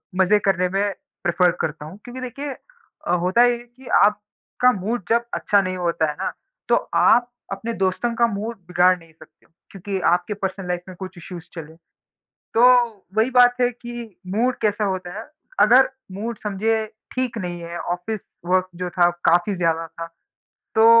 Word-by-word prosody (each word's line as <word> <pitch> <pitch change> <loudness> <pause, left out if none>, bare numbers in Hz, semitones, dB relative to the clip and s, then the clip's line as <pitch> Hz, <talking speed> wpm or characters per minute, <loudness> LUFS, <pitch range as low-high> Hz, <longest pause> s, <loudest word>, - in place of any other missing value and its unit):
मज़े 190 +3 +4
करने 185 -2 +2
में 195 +2 0 0.4
प्रेफ़र 180 +1 +3
करता 150 -1 -3
हूँ 165 +6 -10
क्योंकि 250 +1 -8
देखिए 275 +3 -5 0.5
अ, - - +1
होता 180 +7 +3
ये 245 -1 +2
है 240 - -12
कि 245 +2 -18 0.2
आपका 210 +4 0
मूड 225 +2 -2
जब 235 +1 +2
अच्छा 205 -1 +3
नहीं 185 -1 -3
होता 170 -3 0
है 150 - -4
ना, - - -1 0.4
तो - - +5 0.2
आप 245 0 +5 0.2
अपने 230 +4 -3
दोस्तों 190 +6 0
का 235 +1 +4
मूड 220 +2 -4
बिगाड़ 180 +1 +4
नहीं 165 -1 -19
सकते 160 0 -19
हो - - -31 0.2
क्योंकि 195 0 -4
आपके 180 +4 -1
पर्सनल 195 -2 -4
लाइफ़ 180 0 -1
में 185 - -9
कुछ 190 -1 -8
इश्यूज़ 175 -1 -9
चले। 160 -1 -8 0.8
तो 230 - +5 0.5
वही 225 +4 +3
बात 245 -1 +5
है 245 - +4
कि 240 -4 -9 0.2
मूड 245 +4 +1
कैसा 210 0 +1
होता 185 -2 -2
है, - - -5 0.4
अगर 250 +5 +7 0.2
मूड 220 +3 -5
समझिए 220 +2 0 0.3
ठीक 255 -2 -2
नहीं 175 -3 -4
है, 170 0 -6
ऑफ़िस 175 +5 -3 0.3
वर्क 185 +1 +2
जो 180 - -2
था 175 -1 +4 0.2
काफ़ी 175 +4 +3
ज़्यादा 165 -1 0
था। 165 +1 -7 0.7
तो 220 0 +6
195 Hz, 175 wpm, -22 LUFS, 180-235 Hz, 0.8 s, अगर